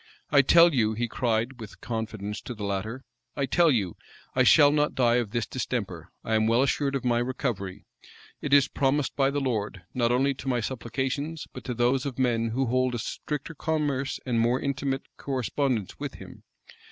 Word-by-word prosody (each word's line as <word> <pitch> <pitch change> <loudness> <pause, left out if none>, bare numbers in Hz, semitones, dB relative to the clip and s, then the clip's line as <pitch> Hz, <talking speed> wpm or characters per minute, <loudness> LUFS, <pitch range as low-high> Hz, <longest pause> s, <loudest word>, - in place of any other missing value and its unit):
"I 140 -1 +7
tell 170 +4 +6
you," 110 -4 +2
he 120 +2 -1
cried 120 +2 -1
with 110 -3 -10
confidence 110 -3 -4
to 125 - -7
the 105 - -7
latter, 100 +6 -3 0.3
"I 140 - 0
tell 170 +4 +4
you, 100 - 0 0.4
I - - +2
shall 145 -2 +7
not 150 0 +1
die 120 -2 +3
of 120 -4 -1
this 115 +1 -1
distemper: 100 -9 -4
I 110 - -2
am 110 0 +3
well 115 +3 +4
assured 140 0 0
of 130 - -3
my 120 -1 +2
recovery. 110 -6 -3 0.6
It 145 - -3
is 140 -1 +6
promised 140 0 0
by 135 -1 +3
the 145 +1 -1
Lord, 105 -8 -2
not 120 -1 +1
only 135 +3 +2
to 135 0 -10
my 125 -2 +1
supplications, 135 +6 -3
but 130 - -8
to 125 - -3
those 125 +4 +1
of 130 - -6
men 120 -3 +1
who 130 +4 0
hold 130 +1 +1
a - - -1
stricter 150 +7 -5
commerce 145 -3 -1
and 120 -3 0
more 120 +3 +2
intimate 135 0 -2 0.2
correspondence 130 -4 -2
with - - -5
him. - - -12
125 Hz, 190 wpm, -27 LUFS, 115-140 Hz, 0.6 s, I